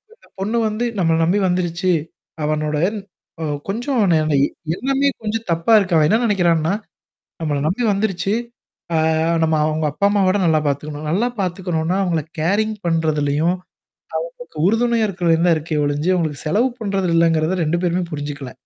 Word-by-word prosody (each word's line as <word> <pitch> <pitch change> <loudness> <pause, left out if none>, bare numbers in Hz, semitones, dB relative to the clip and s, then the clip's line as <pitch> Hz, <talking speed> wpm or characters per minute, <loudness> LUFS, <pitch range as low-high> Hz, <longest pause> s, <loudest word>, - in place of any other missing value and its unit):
இந்த - - -25
பொண்ணு 215 +5 -1
வந்து 215 +3 -2
நம்மள 165 -2 +3
நம்பி 190 +5 +2
வந்துருச்சு. 180 0 0 0.5
அவனுட 150 0 -1 0.6
ஓ! - - -2 0.2
கொஞ்சம் 240 +5 -1
ந - - +5 0.6
எல்லாமே 275 +4 +1
கொஞ்சம் 225 +1 -3
தப்பா 170 +7 +2
இருக்கு. 185 -4 +2
அவன் 150 - +4
என்ன 220 - +3
நெனைக்கிறான்னா? 175 -5 +2 0.7
நம்பல 145 -3 -1
நம்பி 195 +9 -1
வந்துருச்சு. 195 -1 0 0.6
ஆ - - +3 0.5
நம்ம 160 0 +2
அவுங்க 155 0 0
அப்பா 200 - -1
அம்மாவ 200 -2 +2
விட 185 - +3
நல்லா 160 -2 +3
பார்த்துக்கணும். 150 +2 -3
நல்லா 210 +9 +1
பார்த்துக்கணும்னா, 180 -2 -1
அவங்கள 170 -4 0 0.2
கேரிங் 210 +7 +1
பண்றதுலயும். 160 0 +1 0.7
ஆ. - - -12 0.2
உறுதுணையா 230 +1 +2
இருக்கறது 175 -4 +1
தான் 175 -2 +5
இருக்கே 155 -1 -2
ஒழிஞ்சு. 145 +4 0
உங்களுக்கு 155 -4 -2
செலவு 215 +11 +2
பண்றது 195 -3 -1
இல்லங்கிறத 165 +1 +2
2 170 +3 0
பேருமே 180 +1 +1
புரிஞ்சுக்கல. 145 -2 -5
175 Hz, 150 wpm, -20 LUFS, 155-205 Hz, 0.7 s, ந